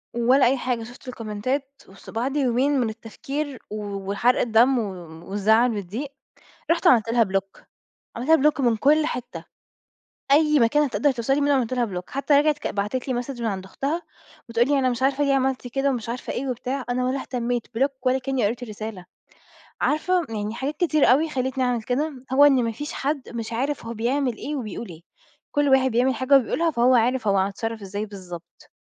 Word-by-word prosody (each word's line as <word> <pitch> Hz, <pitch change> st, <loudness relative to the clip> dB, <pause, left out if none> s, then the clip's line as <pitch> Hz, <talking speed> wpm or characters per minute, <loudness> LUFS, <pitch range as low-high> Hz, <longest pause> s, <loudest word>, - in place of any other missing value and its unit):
ولا 250 Hz, +3 st, +4 dB
أي 265 Hz, +3 st, +3 dB
حاجة، 245 Hz, -2 st, -2 dB
شفُت 245 Hz, +3 st, -13 dB
الكومنتات 250 Hz, +4 st, -3 dB, 0.2 s
بُص 190 Hz, -, -14 dB
وبعد 255 Hz, +6 st, -2 dB
يومين 270 Hz, +1 st, +2 dB
من 235 Hz, -3 st, +1 dB
التفكير 270 Hz, +5 st, -6 dB
و 210 Hz, -, -5 dB, 0.4 s
وحرق 240 Hz, +5 st, +2 dB
الدم 240 Hz, +3 st, +4 dB
و -, -, 0 dB, 0.5 s
والزعل 220 Hz, +5 st, +3 dB
والضيق، 210 Hz, +9 st, -5 dB, 0.6 s
رُحت 335 Hz, -, +2 dB
عملت 230 Hz, -3 st, +5 dB
لها 230 Hz, 0 st, +4 dB
Block 195 Hz, -1 st, -3 dB, 0.5 s
عملت 245 Hz, +6 st, -5 dB
لها 300 Hz, -2 st, +6 dB
Block -, -, -13 dB
من 235 Hz, -3 st, +2 dB
كُلّ 300 Hz, +6 st, +3 dB
حتة، 245 Hz, -4 st, -5 dB, 0.9 s
أي 300 Hz, 0 st, +5 dB
مكان 240 Hz, +6 st, +4 dB
هتقدر 290 Hz, +1 st, +1 dB
توصل 245 Hz, +2 st, 0 dB
لي 290 Hz, -, 0 dB
منُه 285 Hz, 0 st, +3 dB
عملت 255 Hz, -2 st, 0 dB
لها 245 Hz, -2 st, +1 dB
Block 180 Hz, -3 st, -6 dB
حتى 280 Hz, +2 st, +1 dB
رجعت 295 Hz, +1 st, +3 dB
ك -, -, -3 dB
بعتت 210 Hz, +7 st, -3 dB
لي 260 Hz, -, 0 dB
مسدج 245 Hz, 0 st, -4 dB
من 230 Hz, -, 0 dB
عند 190 Hz, -3 st, -4 dB
أختها، 280 Hz, -, -3 dB, 0.5 s
بتقول 235 Hz, +2 st, +2 dB
لي 285 Hz, -1 st, +3 dB
أنا 260 Hz, -1 st, +2 dB
مش 245 Hz, +1 st, -3 dB
عارفة 275 Hz, +2 st, +2 dB
ليه 280 Hz, -1 st, +2 dB
عملت 265 Hz, -1 st, 0 dB
كده 270 Hz, +3 st, 0 dB
ومش 235 Hz, -4 st, -3 dB
عارفة 240 Hz, +2 st, -4 dB
إيه 270 Hz, +2 st, -3 dB
وبتاع، 255 Hz, +2 st, -3 dB
أنا 250 Hz, +1 st, 0 dB
ولا 265 Hz, +2 st, -1 dB
اهتميت 245 Hz, -2 st, -2 dB
Block 275 Hz, +3 st, +3 dB
ولا 255 Hz, 0 st, +2 dB
كأني 265 Hz, -3 st, -1 dB
قريت 230 Hz, +4 st, -3 dB
الرسالة، 215 Hz, -4 st, -7 dB, 0.8 s
عارفة 355 Hz, +4 st, +1 dB
يعني 215 Hz, -1 st, -4 dB
حاجات 275 Hz, +5 st, -3 dB
كتيرة 310 Hz, -3 st, +2 dB
أوي 280 Hz, +7 st, +4 dB
خلّيتني 260 Hz, -1 st, -1 dB
أعمل 245 Hz, -2 st, 0 dB
كده، 265 Hz, +2 st, -2 dB
هو 280 Hz, +2 st, +6 dB
إن 270 Hz, -4 st, +5 dB
ما 230 Hz, -, -1 dB
فيش 295 Hz, +7 st, -6 dB
حد 280 Hz, -1 st, -3 dB
مش 230 Hz, -1 st, -5 dB
عارف 265 Hz, +2 st, -2 dB
هو 230 Hz, -, -5 dB
بيعمل 245 Hz, +2 st, 0 dB
إيه 295 Hz, +5 st, -4 dB
وبيقول 230 Hz, -2 st, -5 dB
إيه، 165 Hz, -2 st, -11 dB, 0.5 s
كُلّ 290 Hz, 0 st, +2 dB
واحد 265 Hz, -1 st, +4 dB
بيعمل 250 Hz, +3 st, +2 dB
حاجة 260 Hz, +4 st, +4 dB
وبيقولها 325 Hz, +6 st, +1 dB
فهو 250 Hz, -2 st, +3 dB
عارف 245 Hz, -1 st, +2 dB
هو 195 Hz, -1 st, +3 dB
هيتصرف 220 Hz, +4 st, -2 dB
إزاي 200 Hz, +2 st, -4 dB
بالضبط. 180 Hz, -4 st, -11 dB
250 Hz, 200 wpm, -24 LUFS, 225-275 Hz, 0.9 s, لها